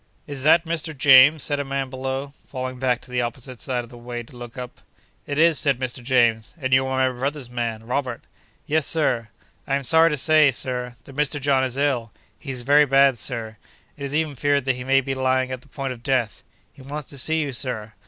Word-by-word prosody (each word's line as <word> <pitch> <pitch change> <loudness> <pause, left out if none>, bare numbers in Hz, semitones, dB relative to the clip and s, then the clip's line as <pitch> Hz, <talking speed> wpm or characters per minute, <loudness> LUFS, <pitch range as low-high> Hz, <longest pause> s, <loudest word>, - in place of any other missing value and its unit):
'Is 140 -3 -4
that 160 +4 +5
Mr. 160 -2 -3
James?' 140 +2 +7
said 145 -1 0
a - - 0
man 135 -1 -3
below, 135 +1 -4
falling 130 -1 -5
back 125 -2 0
to 130 - -15
the 125 0 0
opposite 125 0 -5
side 125 -2 -2
of 120 - -14
the 120 - -12
way 120 0 -6
to 120 - -17
look 120 0 -10
up. 125 -1 -8 0.5
'It 145 - -3
is,' 165 -1 +4
said 140 -4 +1
Mr. 130 0 -2
James, 120 -3 +1
'and 130 -2 -1
you 130 0 +4
are 130 0 +1
my 120 - -12
brother's 140 -2 -3
man, 115 -2 -3
Robert.' 125 -1 -3 0.4
'Yes, 155 -1 +1
Sir. 125 -8 +1 0.4
I 135 - +1
am 140 - -2
sorry 160 +5 +5
to 150 - -1
say, 155 +1 +5
Sir, 125 -1 -3
that 135 - -14
Mr. 150 0 0
John 135 -1 +2
is 130 0 -2
ill. 130 -6 0 0.3
He 145 - -10
is 125 -2 -4
very 145 +3 +5
bad, 135 -2 +4
Sir. 115 -4 -5 0.4
It 145 - -9
is 140 +1 -3
even 155 -2 0
feared 140 +1 +1
that 130 -2 +1
he 125 - -6
may 135 +1 +3
be 135 0 -3
lying 130 0 0
at 130 -1 -5
the - - -20
point 135 -2 -4
of 120 - -14
death. 120 -4 -1 0.3
He - - -16
wants 145 +2 -7
to 140 - -6
see 160 +5 +1
you, 145 -3 -2
Sir. 120 -4 -3
130 Hz, 230 wpm, -23 LUFS, 125-145 Hz, 0.5 s, James